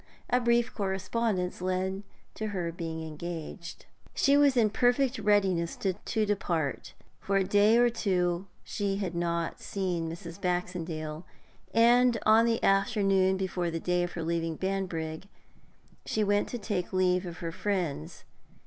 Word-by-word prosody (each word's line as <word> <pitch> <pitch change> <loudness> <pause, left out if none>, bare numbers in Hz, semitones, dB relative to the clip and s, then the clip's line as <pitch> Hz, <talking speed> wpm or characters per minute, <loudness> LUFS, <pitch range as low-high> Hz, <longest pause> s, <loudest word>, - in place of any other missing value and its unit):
A 250 - +4
brief 235 0 +2
correspondence 190 -1 -1
led 185 +1 -1 0.3
to 220 - -4
her 180 -5 -2
being 165 -1 -5
engaged. 165 +2 -7 0.3
She 280 0 +4
was 285 -3 +4
in 220 -3 +4
perfect 245 +2 +2
readiness 195 -5 +2
to 210 +3 -1
depart. 175 -8 -2 0.2
For 195 0 0
a 195 - +3
day 205 +4 +4
or 240 0 +4
two 185 -4 0 0.2
she 200 -2 -2
had 190 -4 -3
not 170 -1 -2
seen 180 -4 -2
Mrs. 170 +2 -8
Baxendale, 170 -3 -3 0.5
and, 240 +1 +5
on 220 +1 +6
the 230 -1 0
afternoon 195 -2 +3
before 180 -2 -2
the 165 0 -3
day 180 +1 0
of 175 0 -3
her 170 - -4
leaving 165 0 -1
Banbrigg, 180 -3 -3 0.8
she 215 - 0
went 205 0 +1
to 245 - -4
take 200 -5 -3
leave 185 0 +2
of 170 0 -7
her 165 -1 -4
friends. 175 - -3
190 Hz, 145 wpm, -29 LUFS, 170-210 Hz, 0.8 s, on